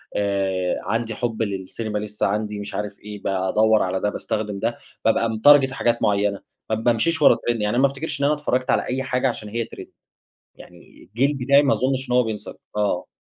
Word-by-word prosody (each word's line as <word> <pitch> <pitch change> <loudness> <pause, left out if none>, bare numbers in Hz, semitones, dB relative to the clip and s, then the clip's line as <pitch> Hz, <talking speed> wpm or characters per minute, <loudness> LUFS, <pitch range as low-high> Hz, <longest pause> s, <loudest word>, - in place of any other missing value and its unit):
آآ، 95 -3 0
عندي 115 0 -2
حُب 115 -2 -3
للسينما 105 +1 -3
لسه، 105 0 -3
عندي 105 +1 -2
مش 100 0 -6
عارف 105 -1 -4
إيه 105 -1 -9
بادوّر 100 +3 +2
على 95 0 -1
ده، 105 - 0
باستخدم 105 -1 -3
ده، 115 +3 -1 0.3
بابقى 115 +1 +3
متارجيت 135 +5 +5
حاجات 120 -3 0
معيّنة، 100 0 +1 0.3
ما 110 - +1
بامشيش 120 +9 +1
ورا 130 - +7
تريند، 120 -2 0
يعني 105 +3 0
ما 135 - +5
افتكرش 140 +4 -4
إن - - +3
أنا 145 - +3
اتفرجت 130 -4 -1
على - - +2
أي 130 +1 -2
حاجة 130 0 0
علشان 110 -4 -4
هي 115 +2 -2
تريند، - - -11 0.7
يعني - - -16
الجيل 130 +8 0
بتاعي 140 +2 +4
ما 140 -1 +2
اظنش 130 0 -1
إن - - +1
هو 125 - +5
بينسى 110 -2 -5 0.2
آه. 100 -4 0
110 Hz, 195 wpm, -22 LUFS, 105-130 Hz, 0.7 s, ورا